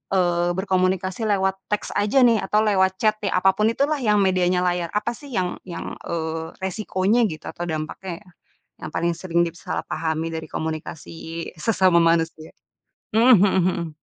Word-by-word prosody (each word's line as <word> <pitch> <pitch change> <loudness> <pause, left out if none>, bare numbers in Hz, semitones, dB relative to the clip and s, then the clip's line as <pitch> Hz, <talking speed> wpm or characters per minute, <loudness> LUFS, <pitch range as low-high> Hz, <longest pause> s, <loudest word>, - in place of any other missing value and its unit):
eee, 175 -1 +2
berkomunikasi 185 +2 0
lewat 190 -2 +1
teks 210 - -2
aja 210 +6 +3
nih, 230 -3 +5
atau 210 +2 +1
lewat 190 -3 +2
chat 215 -1 +2
ya, 200 -2 -1
apa 190 +1 +4
pun 210 +3 +1
itulah 280 +6 +1
yang 210 -5 +3
medianya 180 -1 +2
layar, 175 -1 0
apa 210 +3 0
sih 265 +5 -11
yang 180 -2 -1
yang, 170 -2 -6 0.2
eee, 160 0 -4
resikonya 200 +3 +1
gitu, 155 -5 -8
atau 175 - -5
dampaknya 165 +4 -5
ya, 190 - -20 0.6
yang - - -7
paling 170 0 0
sering 170 0 0
disalahpahami 165 -1 -3
dari 160 0 -5
komunikasi 160 +1 -5
sesama 185 -2 +3
manusia? 165 -1 +1 0.6
Mhm 235 +4 +6
mhm 200 - +3 0.2
mhm. 170 -4 -3
185 Hz, 155 wpm, -23 LUFS, 165-210 Hz, 0.6 s, Mhm